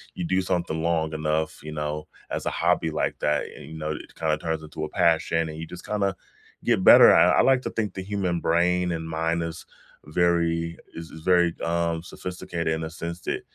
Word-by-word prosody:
you 90 Hz, -, -4 dB
do 95 Hz, +2 st, +1 dB
something 85 Hz, -3 st, -1 dB
long 80 Hz, -1 st, 0 dB
enough, 80 Hz, 0 st, -1 dB
you 75 Hz, -, -7 dB
know, 75 Hz, 0 st, -4 dB, 0.2 s
as -, -, -3 dB
a -, -, +1 dB
hobby 85 Hz, -1 st, +1 dB
like 75 Hz, -, -1 dB
that, 75 Hz, 0 st, +1 dB
and, -, -, -11 dB
you 80 Hz, +2 st, -9 dB
know, 75 Hz, 0 st, -3 dB
it 75 Hz, -, -8 dB
kinda 80 Hz, -1 st, 0 dB
turns 80 Hz, -1 st, -3 dB
into 75 Hz, 0 st, -7 dB
a -, -, -7 dB
passion 80 Hz, 0 st, +2 dB
and 80 Hz, -, -7 dB
you 80 Hz, -, -6 dB
just 90 Hz, +1 st, -10 dB
kinda 100 Hz, -3 st, 0 dB, 0.5 s
get -, -, +2 dB
better, -, -, +9 dB
and -, -, +6 dB
I -, -, +4 dB
like 130 Hz, -1 st, +4 dB
to -, -, -2 dB
think 110 Hz, -3 st, -2 dB
the 95 Hz, -, -5 dB
human 95 Hz, -3 st, -1 dB
brain 90 Hz, +2 st, +2 dB
and 80 Hz, -1 st, -4 dB
mind 80 Hz, +1 st, -1 dB
is 85 Hz, 0 st, -6 dB, 0.4 s
very 85 Hz, 0 st, +1 dB, 0.2 s
is 80 Hz, -1 st, -8 dB
is 80 Hz, -, -10 dB
very, 85 Hz, -1 st, +3 dB
um, 85 Hz, 0 st, 0 dB
sophisticated 90 Hz, -1 st, -4 dB
in 80 Hz, -, -3 dB
the 80 Hz, -, -4 dB
sense 85 Hz, +1 st, -6 dB
that -, -, -3 dB
85 Hz, 215 wpm, -25 LUFS, 80-90 Hz, 0.5 s, better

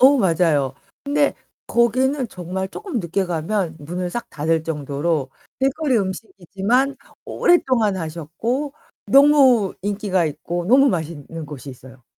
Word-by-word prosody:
어 275 Hz, +3 st, +7 dB
맞아요. 160 Hz, -, +2 dB, 0.3 s
근데 285 Hz, 0 st, +2 dB, 0.3 s
거기는 255 Hz, +2 st, +1 dB
정말 185 Hz, +1 st, -5 dB
쪼끔 350 Hz, -, -4 dB
늦게 185 Hz, +2 st, -1 dB
가면 170 Hz, +1 st, -1 dB
문을 175 Hz, +4 st, -4 dB
싹 240 Hz, -, -5 dB
닫을 160 Hz, +2 st, 0 dB
정도로 150 Hz, -1 st, -2 dB, 0.3 s
길거리 270 Hz, -2 st, +1 dB
음식이지만 200 Hz, +6 st, -1 dB, 0.3 s
오랫동안 250 Hz, -, +2 dB
하셨고 180 Hz, -, -3 dB, 0.3 s
너무 270 Hz, -7 st, +5 dB
인기가 200 Hz, -3 st, 0 dB
있고 170 Hz, +3 st, -3 dB
너무 270 Hz, +4 st, +6 dB
맛있는 165 Hz, -, -4 dB
곳이 145 Hz, -2 st, -9 dB
있어요. 130 Hz, 0 st, -14 dB
190 Hz, 280 characters per minute, -21 LUFS, 160-255 Hz, 0.3 s, 어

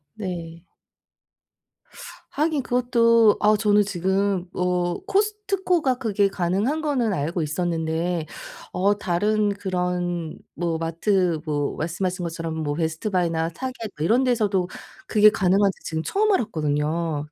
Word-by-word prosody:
네. 170 Hz, -5 st, -6 dB, 1.7 s
하긴 305 Hz, -2 st, 0 dB
그것도 230 Hz, -3 st, +4 dB
아 210 Hz, +1 st, +4 dB
저는 210 Hz, 0 st, +4 dB
지금 190 Hz, 0 st, 0 dB
어 180 Hz, -1 st, 0 dB
코스트코가 390 Hz, -, +1 dB
그게 205 Hz, -4 st, +2 dB
가능한 195 Hz, -, -1 dB
거는 255 Hz, -8 st, 0 dB
알고 165 Hz, +3 st, -1 dB
있었는데 165 Hz, +1 st, -1 dB, 0.5 s
어 200 Hz, +3 st, +1 dB
다른 205 Hz, +3 st, +1 dB
그런 180 Hz, -4 st, -2 dB, 0.2 s
뭐 170 Hz, -2 st, -1 dB
마트 170 Hz, +1 st, +1 dB
뭐 145 Hz, -2 st, -1 dB
말씀하신 180 Hz, +3 st, -2 dB
것처럼 165 Hz, -1 st, -4 dB
뭐 145 Hz, -1 st, -1 dB
베스트 160 Hz, +5 st, -2 dB
바이나 165 Hz, -3 st, 0 dB
타겟 260 Hz, +9 st, -5 dB, 0.2 s
뭐 150 Hz, -, -3 dB
이런 235 Hz, +8 st, +3 dB
데서도 210 Hz, -8 st, +1 dB, 0.4 s
그게 215 Hz, 0 st, +6 dB
가능한지 195 Hz, -1 st, +2 dB
지금 160 Hz, 0 st, -3 dB
처음 425 Hz, -, +1 dB
알았거든요. 155 Hz, -, -1 dB
185 Hz, 265 characters per minute, -23 LUFS, 165-220 Hz, 1.7 s, 그게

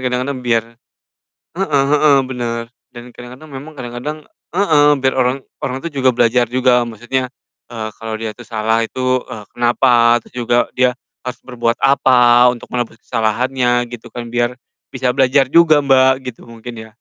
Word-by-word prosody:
kadang-kadang 130 Hz, +2 st, -2 dB
biar 115 Hz, -2 st, +1 dB, 0.9 s
heeh 155 Hz, -7 st, 0 dB
heeh, 150 Hz, -1 st, +4 dB
bener, 120 Hz, -2 st, -4 dB, 0.3 s
dan 120 Hz, -, -8 dB
kadang-kadang 125 Hz, +5 st, -12 dB
memang 150 Hz, +4 st, -9 dB
kadang-kadang 125 Hz, +4 st, -6 dB, 0.4 s
heeh, 155 Hz, -7 st, +4 dB
biar 130 Hz, 0 st, +1 dB
orang 125 Hz, +1 st, +1 dB, 0.2 s
orang 130 Hz, -, -3 dB
tuh 170 Hz, -, -4 dB
juga 130 Hz, -2 st, +1 dB
belajar 120 Hz, 0 st, +2 dB
juga 125 Hz, 0 st, +3 dB
maksudnya, 120 Hz, +3 st, -3 dB, 0.4 s
eee, 115 Hz, -2 st, -5 dB
kalo 110 Hz, -1 st, -4 dB
dia 110 Hz, 0 st, -5 dB
tuh 120 Hz, 0 st, -14 dB
salah 110 Hz, 0 st, 0 dB
itu, 130 Hz, +2 st, -1 dB
eee, 105 Hz, -2 st, -8 dB
kenapa, 120 Hz, -1 st, +3 dB
terus -, -, -20 dB
juga 120 Hz, -1 st, -1 dB, 0.2 s
dia 125 Hz, 0 st, +1 dB, 0.2 s
harus 125 Hz, -1 st, -7 dB
berbuat 120 Hz, -2 st, -1 dB
apa 125 Hz, -3 st, +5 dB
untuk -, -, -14 dB
menebus 120 Hz, -2 st, -3 dB
kesalahannya 120 Hz, +2 st, 0 dB
gitu 120 Hz, -, -9 dB
kan, 120 Hz, -1 st, -8 dB
biar 120 Hz, +1 st, 0 dB, 0.3 s
bisa 130 Hz, -1 st, -1 dB
belajar 135 Hz, +2 st, +3 dB
juga 155 Hz, -4 st, +5 dB
Mbak, 130 Hz, -1 st, +5 dB, 0.2 s
gitu 115 Hz, -, -18 dB
mungkin 115 Hz, +1 st, -9 dB, 0.2 s
ya. -, -, -22 dB
125 Hz, 160 wpm, -17 LUFS, 120-130 Hz, 0.9 s, apa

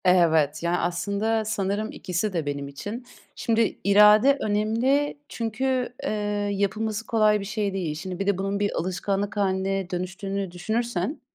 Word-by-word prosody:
Evet. 160 Hz, -4 st, +3 dB
Ya, 170 Hz, +1 st, +1 dB
aslında 200 Hz, +6 st, 0 dB
sanırım 210 Hz, 0 st, -1 dB
ikisi 185 Hz, +3 st, -2 dB
de 165 Hz, -4 st, -1 dB
benim 140 Hz, -1 st, -3 dB
için. 205 Hz, -, -7 dB, 0.3 s
Şimdi 225 Hz, -1 st, +1 dB
irade 210 Hz, +7 st, +6 dB
önemli 230 Hz, +8 st, +1 dB
çünkü, 250 Hz, +2 st, -1 dB
eee, -, -, -1 dB, 0.4 s
yapılması 210 Hz, +2 st, -1 dB
kolay 215 Hz, -2 st, +3 dB
bir 200 Hz, -, -5 dB
şey 205 Hz, -1 st, -2 dB
değil. 175 Hz, -6 st, -2 dB
Şimdi 180 Hz, +3 st, -6 dB
bir 195 Hz, -, -2 dB
de 200 Hz, -2 st, +2 dB
bunun 195 Hz, +1 st, -2 dB
bir 205 Hz, 0 st, +1 dB
alışkanlık 195 Hz, +3 st, -2 dB
hâline 195 Hz, -1 st, 0 dB
dönüştüğünü 190 Hz, +1 st, -3 dB
düşünürsen, 220 Hz, -, -2 dB
200 Hz, 145 wpm, -25 LUFS, 180-220 Hz, 0.4 s, irade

